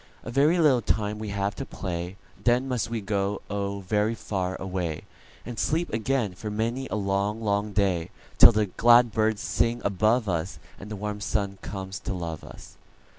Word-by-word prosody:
"A - - -6
very 145 +7 +4
little 145 -7 +4
time 105 0 0
we 110 -1 -4
have 100 0 -1
to 135 - -3
play, 90 -5 -5 0.3
Then 120 +2 +3
must 125 -3 -1
we 115 -1 -2
go, 100 0 -1
oh, 100 0 -2
very 105 +4 +1
far 95 -4 -3
away, 90 -4 -3 0.4
And 120 -2 -6
sleep 165 +3 0
again 115 -2 0
for 105 +4 -6
many 115 +5 -2
a - - -3
long, 100 +1 0
long 105 -1 0
day, 95 -5 +1 0.3
Till - - +11
the 110 -1 +2
glad 120 +4 +5
birds 110 -1 +1
sing 120 +1 +1
above 110 +4 +2
us, 85 0 -2 0.2
And 100 - -9
the 105 - -4
warm 105 0 -4
sun 100 -2 -1
comes 95 0 -6
to 100 - -4
love 85 -3 -5
us. - - -12
105 Hz, 180 wpm, -26 LUFS, 95-115 Hz, 0.4 s, Till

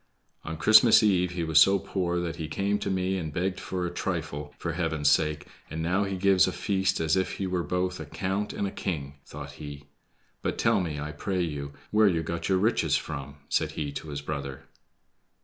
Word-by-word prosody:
"On 80 0 -5
Christmas 110 +6 +7
eve 90 -4 +3
he 85 -1 -2
was 80 -1 +5
so 95 +4 +6
poor 90 -2 -1
that 85 -1 -3
he 80 - -4
came 100 +6 0
to - - -3
me 95 0 0
and 80 -3 -4
begged 90 +4 -1
for 90 -2 -3
a 85 - -3
trifle, 80 -5 -3
for - - -3
Heaven's 75 -2 +1
sake, 75 +1 +1 0.2
and 80 +1 -4
now 95 +4 +1
he 95 -1 -3
gives 95 -2 +4
a - - 0
feast 95 -1 0
as 80 -1 +2
if 95 -1 0
he 95 - -3
were 90 -1 -1
both 90 +3 -1
a 80 - -7
count 95 +6 -2
and 100 - -2
a - - -5
king!" 70 -8 -4
thought 70 -1 -8
he. 70 -1 -9 0.5
"But - - -2
tell - - +3
me, 80 -4 -3
I 75 +1 -4
pray 90 +5 -2
you, 70 -3 -4 0.2
where 105 0 +5
you 85 -4 +1
got 85 +3 -3
your 95 - +4
riches 110 +5 +2
from?" 70 -2 -6
said - - 0
he 75 -2 -3
to 75 +2 -7
his 70 -1 -4
brother. 70 -2 -5
85 Hz, 215 wpm, -27 LUFS, 75-95 Hz, 0.5 s, Christmas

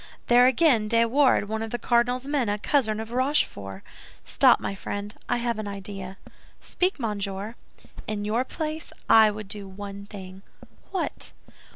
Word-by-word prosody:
"There 245 +1 +6
again! 255 -5 +4
De 230 +1 +3
Wardes, 255 -3 +3
one 220 +1 -3
of 225 - -3
the 240 - -2
cardinal's 245 +2 +1
men, 280 -6 0
a 205 - 0
cousin 220 -2 +1
of 220 +1 -6
Rochefort! 240 - 0 0.4
Stop, - - +5
my - - -3
friend, 205 +1 -5 0.2
I 245 - +2
have 235 -2 -1
an 215 - -4
idea." 195 -1 -7 0.4
"Speak, 365 -2 -1
monsieur." 205 -2 -3 0.5
"In 205 -1 -3
your 225 +4 +1
place, 310 +3 -5 0.2
I 220 -1 +7
would 210 -1 -6
do 200 -1 -7
one 200 +1 -8
thing." 190 -2 -10 0.5
"What?" 380 - -3
220 Hz, 160 wpm, -26 LUFS, 200-245 Hz, 0.5 s, I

